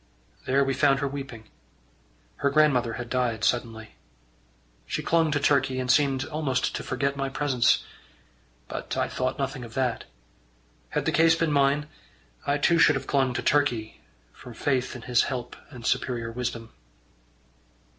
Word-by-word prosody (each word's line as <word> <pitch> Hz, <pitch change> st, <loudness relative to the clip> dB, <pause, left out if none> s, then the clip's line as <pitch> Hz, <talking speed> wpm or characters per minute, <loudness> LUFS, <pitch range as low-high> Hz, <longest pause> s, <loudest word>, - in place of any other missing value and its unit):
There 135 Hz, +2 st, +3 dB
we 135 Hz, 0 st, 0 dB
found 135 Hz, 0 st, +3 dB
her 140 Hz, +1 st, -1 dB
weeping. 135 Hz, -5 st, -7 dB, 0.9 s
Her 140 Hz, -, +1 dB
grandmother 140 Hz, -6 st, +3 dB
had 120 Hz, +1 st, -5 dB
died 120 Hz, -3 st, -1 dB
suddenly. 115 Hz, -3 st, -1 dB, 0.9 s
She -, -, -3 dB
clung 165 Hz, -1 st, +2 dB
to 150 Hz, -1 st, +1 dB
Turkey, 135 Hz, -2 st, +2 dB
and 125 Hz, -1 st, +1 dB
seemed 135 Hz, -1 st, +2 dB
almost 150 Hz, -4 st, -1 dB
to -, -, -3 dB
forget 140 Hz, +1 st, -2 dB
my 135 Hz, -1 st, -2 dB
presence. 135 Hz, -3 st, +2 dB, 0.8 s
But -, -, -5 dB
I -, -, +1 dB
thought 130 Hz, 0 st, -2 dB
nothing 135 Hz, -2 st, -3 dB
of 115 Hz, -1 st, -11 dB
that. 125 Hz, -4 st, -1 dB, 0.8 s
Had -, -, -2 dB
the -, -, +1 dB
case 165 Hz, 0 st, +5 dB
been 165 Hz, -1 st, 0 dB
mine, 140 Hz, +1 st, +2 dB, 0.6 s
I 145 Hz, -, +2 dB
too 170 Hz, +3 st, +3 dB
should 155 Hz, -, +6 dB
have 135 Hz, -, -3 dB
clung 135 Hz, -3 st, +1 dB
to -, -, -2 dB
Turkey 125 Hz, -7 st, 0 dB, 0.3 s
from 125 Hz, -2 st, -12 dB
faith 130 Hz, -1 st, -1 dB
in 120 Hz, -, -9 dB
his 120 Hz, +1 st, +2 dB
help 125 Hz, -3 st, -5 dB
and 120 Hz, -5 st, -11 dB
superior 120 Hz, -3 st, -1 dB
wisdom. 115 Hz, -1 st, -4 dB
135 Hz, 155 wpm, -26 LUFS, 125-145 Hz, 0.9 s, should